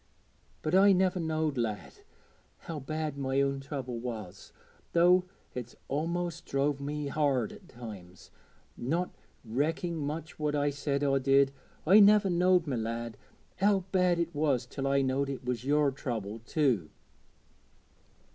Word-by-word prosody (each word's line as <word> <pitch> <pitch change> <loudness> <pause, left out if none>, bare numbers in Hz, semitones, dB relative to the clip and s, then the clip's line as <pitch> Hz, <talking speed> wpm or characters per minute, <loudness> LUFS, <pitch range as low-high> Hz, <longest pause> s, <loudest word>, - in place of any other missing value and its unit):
But 155 - -1
I 195 +1 +7
never 185 0 +2
knowed, 155 -4 -1
lad, 110 -3 -3 0.7
how 160 -3 -6
bad 155 +1 -4
my 135 0 0
own 140 0 +1
trouble 135 -4 -5
was 110 -6 -7 0.4
though 180 +2 +5 0.3
it's 120 -1 -6 0.2
a'most 170 +3 -2
drove 140 +1 0
me 150 +1 -3
hard 140 -6 +1
at - - -13
times, 100 -7 -11 0.4
not 165 +9 -1 0.3
recking 160 +8 -1
much 155 +2 -5
what 150 -1 0
I 145 0 +1
said 140 0 -2
or 135 -1 +3
did 135 +1 +4 0.3
I 190 +6 +7
niver 205 -1 +6
knowed, 180 0 +3
my 135 -5 -2
lad, 115 0 -3 0.4
how 195 -1 +3
bad 180 -2 +3
it 170 0 -1
was 145 -5 +1
till 135 +2 -4
I 140 0 +3
knowed 135 +1 0
it 135 -2 -5
was 125 -1 -2
yer 145 0 +3
trouble 115 -6 -4
too.' 125 - +1
145 Hz, 145 wpm, -30 LUFS, 125-165 Hz, 0.7 s, I